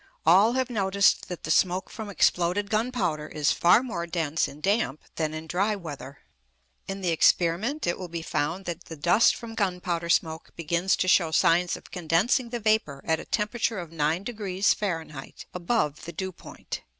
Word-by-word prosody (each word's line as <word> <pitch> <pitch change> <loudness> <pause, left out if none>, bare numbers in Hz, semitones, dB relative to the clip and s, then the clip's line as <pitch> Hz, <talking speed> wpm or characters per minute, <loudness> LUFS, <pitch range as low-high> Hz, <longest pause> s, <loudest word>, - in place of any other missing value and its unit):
All 195 +8 +6
have 260 -1 -1
noticed 200 -2 +2
that 180 - -7
the 160 - -2
smoke 185 +2 +2
from 220 -3 -7
exploded 185 +2 +1
gunpowder 215 -10 -1
is 150 -2 0
far 180 +8 +4
more 170 -9 -4
dense 165 -2 0
in 145 - -11
damp 195 - 0 0.2
than 155 -2 -1
in 155 0 -6
dry 195 +6 0
weather. 145 -7 -9 0.7
In 195 0 -5
the 180 -2 0
experiment 175 - +2
it 175 - -1
will 185 - -5
be 170 -1 -6
found 170 +5 -2
that 175 0 -5
the 165 - -8
dust 175 +9 +4
from 230 -1 -8
gunpowder 180 -5 -2
smoke 160 -1 0
begins 170 +3 0
to 185 - -1
show 175 -3 +4
signs 165 +3 +2
of - - -16
condensing 180 - +1
the 240 0 -4
vapour 215 -11 0
at 160 -1 +1
a - - -8
temperature 220 +1 -1
of 170 -3 -6
9° 185 +5 0
Fahr. 165 -8 -4 0.2
above 175 -5 -1
the 170 - -6
dew 190 0 -4
point. - - -9
180 Hz, 175 wpm, -26 LUFS, 165-205 Hz, 0.7 s, All